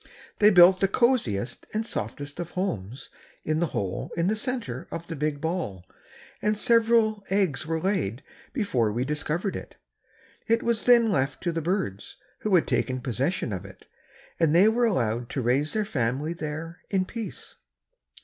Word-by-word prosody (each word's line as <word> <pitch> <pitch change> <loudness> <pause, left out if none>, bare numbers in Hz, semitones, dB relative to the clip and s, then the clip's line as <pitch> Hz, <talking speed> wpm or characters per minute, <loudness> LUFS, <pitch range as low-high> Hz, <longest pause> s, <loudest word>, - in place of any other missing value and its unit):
They 210 - +7
built 185 -1 +7
the 195 - +3
coziest 195 - 0
and 220 +1 0
softest 145 - -5
of 175 -1 -4
homes 125 - -3 0.3
in 155 0 0
the 170 - +1
hole 95 -9 -3
in 170 +2 +2
the 215 - +1
center 215 - -3
of 165 - -6
the 165 - -6
big 150 0 -1
ball 160 - -3 0.6
and 210 0 +1
several 225 -2 +3
eggs 190 -7 0
were 165 0 0
laid 160 - -1 0.3
before 130 - 0
we 120 +4 -1
discovered 155 +6 -2
it. - - -8 0.7
It 230 0 +2
was 235 -2 0
then 235 -3 +6
left 135 -6 -1
to 175 - +1
the 165 0 -2
birds 160 - -3 0.2
who 210 -3 +2
had 170 - +4
taken 130 -1 0
possession 130 - -1
of 95 0 -4
it 95 - -14 0.5
and 165 -2 +3
they 190 +5 +7
were 235 +2 +3
allowed 120 - 0
to 135 - -2
raise 135 +6 +1
their 215 -1 0
family 140 - -1
there 160 +1 -6
in 190 -2 +1
peace. 225 -2 -7
165 Hz, 170 wpm, -26 LUFS, 130-205 Hz, 0.7 s, They